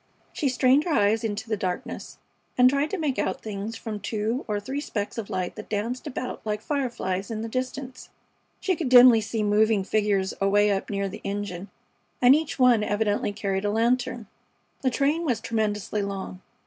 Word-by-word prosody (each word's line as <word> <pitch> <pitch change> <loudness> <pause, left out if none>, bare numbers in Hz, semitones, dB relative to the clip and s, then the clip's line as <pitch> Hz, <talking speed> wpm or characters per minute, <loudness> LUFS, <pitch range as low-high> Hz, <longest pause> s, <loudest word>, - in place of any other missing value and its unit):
She 285 - 0
strained 260 +3 +3
her - - -2
eyes 220 -4 +2
into 215 0 -3
the 220 - 0
darkness, 185 -3 -5 0.4
and 250 0 +7
tried 280 +2 +1
to 395 - -2
make 300 -6 -1
out - - -1
things 210 +1 -5
from 220 -2 -5
the - - -12
two 220 +5 -2
or 210 -2 -1
three 265 +7 -4
specks 210 -5 -4
of 215 - -6
light 180 -1 -2
that 215 - -8
danced 225 +4 -3
about 250 0 -5
like 210 -1 -2
fireflies 235 -9 -2
in 220 -1 -4
the - - -3
distance. 255 +2 -5 0.5
She 375 - 0
could 315 -6 -2
dimly 245 -2 +8
see 215 +1 -2
moving 210 0 +3
figures 200 -2 +1
away 205 +1 +4
up 195 -1 -2
near 200 -1 -1
the 190 - -8
engine, 200 -2 -4 0.5
and 250 +1 +7
each 310 0 0
one 250 -4 +5
evidently 205 0 0
carried 195 -1 -2
a 205 - +1
lantern. 235 +1 0 0.6
The 260 - +2
train 285 +7 +1
was 250 -9 0
tremendously 215 -2 -1
long. 195 -2 -5
220 Hz, 185 wpm, -25 LUFS, 205-255 Hz, 0.6 s, dimly